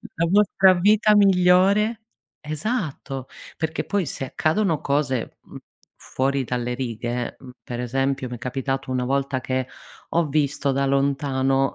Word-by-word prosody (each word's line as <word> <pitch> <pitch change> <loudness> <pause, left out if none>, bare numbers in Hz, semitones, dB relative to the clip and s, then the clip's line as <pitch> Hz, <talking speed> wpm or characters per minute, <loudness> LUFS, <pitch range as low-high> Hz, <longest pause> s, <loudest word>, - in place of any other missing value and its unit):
la 170 +1 +1
nostra 195 -2 +5
vita 210 +3 +4
migliore 200 +3 +4 0.4
esatto, 150 - -4 0.3
perché 160 0 -2
poi 200 -4 0
se 135 - -4
accadono 160 +4 0
cose, 140 -4 -1
mhmm, - - -12 0.4
fuori 135 +1 -1
dalle 125 0 -2
righe, 120 -1 -4
mhmm, 130 -2 -12
per 120 -1 -6
esempio 135 +1 -1
mi 125 - -5
è - - -22
capitato 135 +1 -3
una 125 -1 -1
volta 135 0 -1
che 130 +1 -2 0.4
ho 170 0 +2
visto 140 -1 0
da 140 +1 +1
lontano 135 -1 +1
140 Hz, 140 wpm, -23 LUFS, 130-175 Hz, 0.4 s, nostra